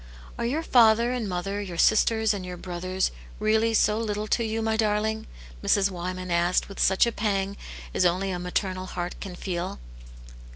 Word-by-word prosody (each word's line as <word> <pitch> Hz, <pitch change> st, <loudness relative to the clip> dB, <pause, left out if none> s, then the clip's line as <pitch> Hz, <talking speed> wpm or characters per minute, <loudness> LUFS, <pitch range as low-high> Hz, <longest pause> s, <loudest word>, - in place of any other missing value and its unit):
"Are 235 Hz, -, 0 dB
your 300 Hz, +7 st, -1 dB
father 235 Hz, -3 st, +5 dB
and 240 Hz, -5 st, -2 dB
mother, 195 Hz, +3 st, -2 dB
your 180 Hz, -4 st, -6 dB
sisters 220 Hz, +2 st, +3 dB
and 195 Hz, -2 st, -4 dB
your 180 Hz, -1 st, -6 dB
brothers, 185 Hz, +1 st, -2 dB, 0.3 s
really 220 Hz, +1 st, +2 dB
so 215 Hz, 0 st, +3 dB
little 210 Hz, -2 st, -2 dB
to 235 Hz, -, +2 dB
you, 225 Hz, 0 st, -2 dB
my 220 Hz, 0 st, +1 dB
darling 220 Hz, 0 st, 0 dB, 0.2 s
?'* -, -, -17 dB
Mrs. 200 Hz, -1 st, +3 dB
Wyman 185 Hz, 0 st, -5 dB
asked, 170 Hz, +1 st, +2 dB
with 195 Hz, -, -10 dB
such 190 Hz, +3 st, +4 dB
a 235 Hz, -, 0 dB
pang 200 Hz, -2 st, -1 dB, 0.4 s
as -, -, +2 dB
only 185 Hz, +2 st, +1 dB
a 180 Hz, -, -3 dB
maternal 185 Hz, +1 st, -2 dB
heart 175 Hz, -1 st, -4 dB
can 190 Hz, -2 st, -7 dB
feel. 175 Hz, -, -4 dB
195 Hz, 180 wpm, -26 LUFS, 180-220 Hz, 0.4 s, father